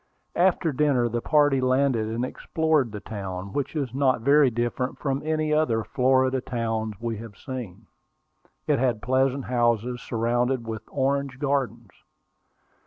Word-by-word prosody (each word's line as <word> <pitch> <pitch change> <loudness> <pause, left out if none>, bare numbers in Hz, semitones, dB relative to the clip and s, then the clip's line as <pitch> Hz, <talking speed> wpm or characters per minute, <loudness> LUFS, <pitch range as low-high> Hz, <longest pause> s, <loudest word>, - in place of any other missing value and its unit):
After 175 -2 +2
dinner 130 -4 +2
the 120 +1 -2
party 145 -2 +3
landed 130 -3 +2
and 115 +3 -2
explored 155 -3 0
the 105 -1 -7
town, 95 -2 -6
which 145 +2 -2
is 135 -6 -2
not 130 -3 +2
very 140 +2 +5
different 120 +2 -2
from 135 -2 -2
any 155 0 0
other 120 -8 +2
Florida 130 +2 +2
towns 110 -3 -2
we 115 -2 -3
had 110 -2 -10
seen. 125 -9 -7 0.8
It - - +2
had 120 -5 0
pleasant 130 +1 +1
houses, 120 0 0
surrounded 120 +2 0
with 110 -1 -5
orange 140 -1 -1
gardens. 130 -7 -2
125 Hz, 140 wpm, -25 LUFS, 115-140 Hz, 0.8 s, very